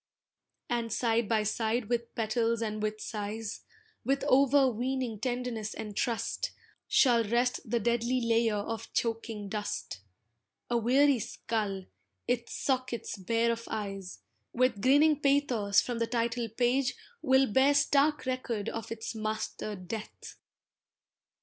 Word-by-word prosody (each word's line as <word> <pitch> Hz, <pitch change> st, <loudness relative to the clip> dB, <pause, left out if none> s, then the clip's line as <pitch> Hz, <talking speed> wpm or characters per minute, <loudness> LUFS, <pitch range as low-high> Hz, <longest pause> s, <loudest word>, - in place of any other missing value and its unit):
And 235 Hz, -1 st, -1 dB
side 230 Hz, -1 st, +1 dB
by 220 Hz, -2 st, +2 dB
side 220 Hz, +2 st, 0 dB
with 235 Hz, 0 st, -2 dB
petals 230 Hz, +1 st, 0 dB
and 215 Hz, -1 st, -3 dB
with 215 Hz, 0 st, -2 dB
sighs, 210 Hz, 0 st, -5 dB, 0.4 s
With 275 Hz, +3 st, 0 dB
overweening 260 Hz, -3 st, +2 dB
tenderness 245 Hz, -2 st, -3 dB
and 210 Hz, -2 st, -6 dB
trust, 240 Hz, -, -1 dB, 0.4 s
Shall 240 Hz, -4 st, +4 dB
rest 240 Hz, +3 st, +1 dB
the 235 Hz, +1 st, +1 dB
deadly 235 Hz, +2 st, +1 dB
layer 230 Hz, -2 st, +2 dB
of 215 Hz, +2 st, -4 dB
choking 225 Hz, -2 st, -2 dB
dust: 205 Hz, -, -4 dB, 0.7 s
A 240 Hz, -, +3 dB
weary 265 Hz, +3 st, +4 dB
skull, 205 Hz, -4 st, -3 dB, 0.4 s
its 240 Hz, -1 st, -1 dB
sockets 255 Hz, -5 st, -2 dB
bare 230 Hz, +4 st, +1 dB
of 230 Hz, 0 st, -4 dB
eyes, 195 Hz, -3 st, -5 dB, 0.3 s
With 250 Hz, -4 st, +2 dB
grinning 290 Hz, +5 st, +5 dB
pathos 260 Hz, -8 st, +3 dB
from 240 Hz, -2 st, -4 dB
the 230 Hz, -, +1 dB
title 235 Hz, 0 st, -1 dB
page 250 Hz, +3 st, +1 dB, 0.3 s
Will 265 Hz, 0 st, +4 dB
bear 265 Hz, +5 st, +4 dB
stark 285 Hz, +1 st, +3 dB
record 255 Hz, -5 st, -2 dB
of 225 Hz, -1 st, -6 dB
its 225 Hz, 0 st, -4 dB
master 215 Hz, -1 st, -3 dB
Death. 200 Hz, +4 st, -7 dB
230 Hz, 125 wpm, -30 LUFS, 215-255 Hz, 0.7 s, grinning